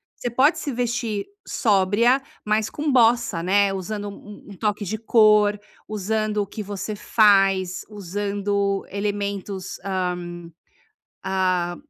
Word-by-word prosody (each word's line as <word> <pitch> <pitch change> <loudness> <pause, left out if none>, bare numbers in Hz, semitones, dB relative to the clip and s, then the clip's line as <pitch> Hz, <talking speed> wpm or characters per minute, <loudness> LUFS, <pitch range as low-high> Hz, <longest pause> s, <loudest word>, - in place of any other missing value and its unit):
Você 245 - -4
pode 265 +7 +3
se 285 - -3
vestir 235 -3 -2 0.2
sóbria, 220 +5 +3 0.2
mas 215 0 +1
com 300 0 -2
bossa, 235 -7 +3
né. 195 +2 +2
Usando 205 +2 -4
um 205 +1 -12
um 200 - -10
toque 210 -1 -1
de 215 +3 -3
cor, 210 -2 +4 0.3
usando 215 +1 -2
o 205 -2 0
que 215 - -7
você 205 +1 -5
faz, 195 -4 +3
usando 200 0 -2
elementos, 200 -1 -4
hã, 180 -3 -3 0.8
ah, 185 -2 0
205 Hz, 120 wpm, -23 LUFS, 195-215 Hz, 0.8 s, cor